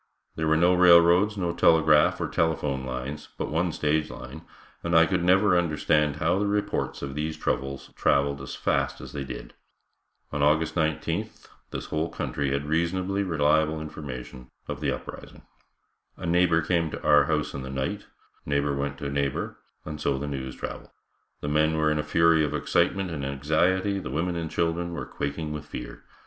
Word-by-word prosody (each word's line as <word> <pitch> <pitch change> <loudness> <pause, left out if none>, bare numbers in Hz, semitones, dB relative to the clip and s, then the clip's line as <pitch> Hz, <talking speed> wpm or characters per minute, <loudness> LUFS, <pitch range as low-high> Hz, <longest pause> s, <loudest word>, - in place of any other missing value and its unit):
There 80 0 -1
were 80 0 +4
no 90 +2 +4
railroads, 90 +3 +6
no 85 -3 -1
telegraph 80 -3 +4
or - - -1
telephone 75 -5 0
lines, 65 +3 -5
but - - -3
one 85 +2 +1
stage 75 0 0
line, - - -9 0.4
and 85 0 -1
I 80 0 +7
could 90 -1 0
never 95 +2 +4
understand 75 -3 +2
how 85 +4 +1
the 105 - 0
reports 105 -5 -1
of 70 -1 -4
these 75 +2 -3
troubles 70 0 -3
traveled 70 0 +1
as 70 - -7
rapidly - - 0
as - - -10
they 70 - -3
did. 65 - -8 0.8
On 75 - -2
August 80 +2 +3
19th 80 -3 -2 0.2
this - - -5
whole 80 +2 -2
country 70 -1 -2
had 70 +1 -1
reasonably 90 +5 0
reliable 80 -3 +2
information 65 -5 -8 0.2
of - - -5
the - - +1
uprising. - - -8 0.7
A - - -7
neighbor 85 -1 +3
came 85 -1 +1
to - - -7
our 75 0 +5
house 75 -2 -1
in 70 - -5
the 65 - -7
night, 65 0 -3 0.4
neighbor 70 0 0
went 70 0 -3
to 70 - -4
neighbor 70 -1 -2 0.3
and 75 0 -6
so 70 -2 +1
the 70 - -4
news 65 -3 -5
traveled. - - -7 0.5
The - - -4
men 75 +1 +2
were 75 0 +2
in 75 - 0
a - - 0
fury 80 +1 +4
of 75 0 -1
excitement 95 +4 +1
and 75 -4 -4
anxiety, 85 +9 +1
the 90 - -6
women 85 +6 -1
and 85 -1 -3
children 85 +2 -1
were - - -4
quaking 75 +2 -4
with 75 -1 -7
fear. - - -8
80 Hz, 180 wpm, -26 LUFS, 70-85 Hz, 0.8 s, I